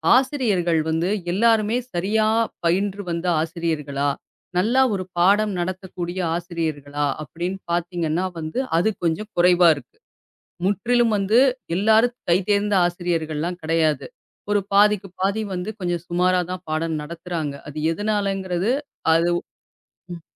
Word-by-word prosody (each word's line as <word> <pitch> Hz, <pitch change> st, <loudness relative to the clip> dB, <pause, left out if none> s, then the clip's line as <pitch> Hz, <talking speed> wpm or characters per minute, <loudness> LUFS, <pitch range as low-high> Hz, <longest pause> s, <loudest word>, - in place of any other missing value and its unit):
ஆசிரியர்கள் 220 Hz, -, +2 dB
வந்து 165 Hz, +3 st, 0 dB, 0.2 s
எல்லாருமே 225 Hz, +2 st, +3 dB, 0.2 s
சரியா 210 Hz, +5 st, +1 dB, 0.4 s
பயின்று 195 Hz, +4 st, +1 dB
வந்த 170 Hz, +2 st, -2 dB
ஆசிரியர்களா? 155 Hz, -4 st, -2 dB, 0.5 s
நல்லா 235 Hz, +8 st, +3 dB
ஒரு 185 Hz, -1 st, -2 dB
பாடம் 205 Hz, +4 st, +4 dB
நடத்தக்கூடிய 185 Hz, 0 st, -4 dB, 0.2 s
ஆசிரியர்களா? 155 Hz, -4 st, -3 dB, 0.2 s
அப்டின்னு 175 Hz, +6 st, -5 dB
பாத்தீங்கன்னா 170 Hz, 0 st, -1 dB
வந்து 155 Hz, +10 st, -3 dB, 0.2 s
அது 185 Hz, +6 st, +3 dB
கொஞ்சம் 170 Hz, +6 st, -1 dB
குறைவா 175 Hz, 0 st, +5 dB
இருக்கு. 140 Hz, -4 st, -13 dB, 0.7 s
முற்றிலும் 235 Hz, +3 st, +2 dB
வந்து 200 Hz, +4 st, +2 dB, 0.4 s
எல்லாரும் 220 Hz, +5 st, +3 dB
கைதேர்ந்த 200 Hz, +3 st, +2 dB
ஆசிரியர்கள்லாம் 175 Hz, -1 st, -2 dB
கெடையாது. 155 Hz, -1 st, +1 dB, 0.4 s
ஒரு 205 Hz, -1 st, +3 dB
பாதிக்கு 205 Hz, -1 st, +4 dB
பாதி 200 Hz, +3 st, +1 dB
வந்து 180 Hz, +3 st, -3 dB
கொஞ்சம் 175 Hz, -2 st, -2 dB
சுமாராதான் 180 Hz, +1 st, 0 dB
பாடம் 155 Hz, 0 st, -1 dB
நடத்துறாங்க. 165 Hz, -2 st, -4 dB
அது 150 Hz, -, -10 dB, 0.2 s
எதனாலங்கிறது? 195 Hz, 0 st, -1 dB, 0.4 s
அது 170 Hz, +1 st, +3 dB, 0.8 s
ம். 170 Hz, -, -9 dB
180 Hz, 110 wpm, -22 LUFS, 165-205 Hz, 0.8 s, குறைவா